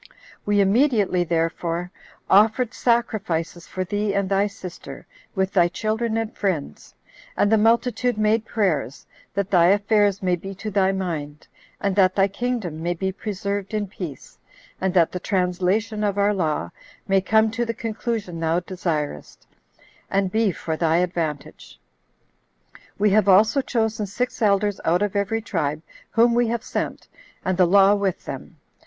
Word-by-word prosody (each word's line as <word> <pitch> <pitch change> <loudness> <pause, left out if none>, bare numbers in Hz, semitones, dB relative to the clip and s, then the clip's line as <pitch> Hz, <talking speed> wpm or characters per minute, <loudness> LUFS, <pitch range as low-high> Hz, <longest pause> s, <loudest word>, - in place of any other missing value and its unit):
We 205 0 +3
immediately, 205 -3 +2
therefore, 170 +1 -2 0.4
offered 220 +4 +4
sacrifices 185 -8 -1
for 185 - -3
thee 205 +2 -2
and 200 -1 +1
thy 200 +1 +2
sister, 185 -3 -10 0.3
with 190 0 0
thy 175 -3 +4
children 220 +4 -2
and 225 0 -3
friends; 185 -8 -3 0.4
and 205 - +2
the 220 - +5
multitude 235 +1 +2
made 215 +1 +2
prayers, 155 - -1 0.3
that 200 -1 -1
thy 175 -3 +5
affairs 205 0 +2
may 180 -1 +2
be 195 +3 -8
to 215 +3 -6
thy 195 -1 +2
mind, 160 -6 -4 0.3
and 200 -2 -1
that 185 -2 +4
thy 195 0 +4
kingdom 200 -6 -3
may 175 +1 -1
be 190 +3 -2
preserved 200 +1 -4
in 210 -1 0
peace, 180 -7 -9 0.4
and 190 0 +1
that 170 -3 +4
the 180 - -4
translation 190 +4 0
of 205 -1 0
our 205 +1 +3
law 160 -6 -1 0.4
may 195 -1 +3
come 220 +3 +3
to 240 +2 -1
the 230 - -1
conclusion 220 -5 -4
thou 165 +1 +1
desirest, 165 - -4 0.6
and 195 -1 0
be 220 -1 +2
for 160 -1 -4
thy 165 0 +2
advantage. 165 -5 -3 1.2
We 210 0 +3
have 205 -1 +3
also 215 +8 +5
chosen 220 -4 -1
six 245 +6 -3
elders 205 -1 +2
out 175 +4 +2
of 205 -1 -2
every 210 +2 -1
tribe, 155 -7 -2 0.3
whom 235 +1 +3
we 240 0 +2
have 230 0 -2
sent, - - -4 0.4
and 185 - +1
the 180 -1 +4
law 195 +2 +6
with 200 -3 -1
them. - - -8
200 Hz, 155 wpm, -23 LUFS, 180-215 Hz, 1.2 s, law